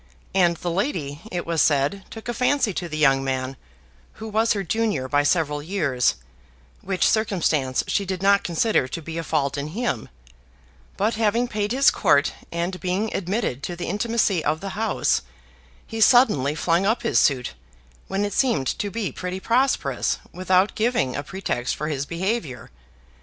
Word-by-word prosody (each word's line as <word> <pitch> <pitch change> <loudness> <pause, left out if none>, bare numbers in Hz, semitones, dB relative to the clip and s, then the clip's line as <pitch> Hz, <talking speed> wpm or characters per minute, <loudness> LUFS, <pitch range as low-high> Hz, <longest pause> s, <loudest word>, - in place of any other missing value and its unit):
And 175 -3 +3
the 175 - -3
lady, 165 - -2
it 175 -1 -3
was 165 -2 +1
said, 145 +7 +1
took 225 0 -9
a 240 - -1
fancy 250 -2 +1
to 175 -1 -4
the 155 - -4
young 135 -3 +4
man, 130 0 -2 0.6
who 220 - -8
was 220 +2 +2
her 200 -2 -2
junior 200 -8 -1
by 145 +2 +2
several 150 -1 +1
years 150 - 0 0.7
(which 190 -1 +1
circumstance 165 -11 +1
she 200 - 0
did 190 -1 -4
not 200 0 +4
consider 170 - +1
to 130 - -5
be 165 +1 -6
a - - -3
fault 145 -3 -1
in 140 - -3
him); 235 - -2 0.9
but 215 +4 +1
having 230 +3 +2
paid 210 -2 -2
his 270 +3 +5
court, 145 +1 +3 0.2
and 175 +2 -2
being 190 +4 -1
admitted 185 - -2
to 175 - -4
the 175 - -5
intimacy 210 -3 0
of 155 +2 0
the 195 +2 -5
house, 215 +2 0 0.6
he 225 0 -5
suddenly 155 - +5
flung 170 +3 +1
up 220 +5 +1
his 230 - +3
suit, 130 -4 +1 0.5
when 195 +1 -1
it 205 - -4
seemed 235 - +1
to 205 - -1
be 210 -1 -3
pretty 180 +1 -5
prosperous, 255 +6 +1 0.2
without 185 +2 +2
giving 220 - 0
a - - -2
pretext 145 -6 -3
for 150 +1 -3
his 140 -2 -3
behavior. 170 - -3
185 Hz, 170 wpm, -23 LUFS, 150-215 Hz, 0.9 s, his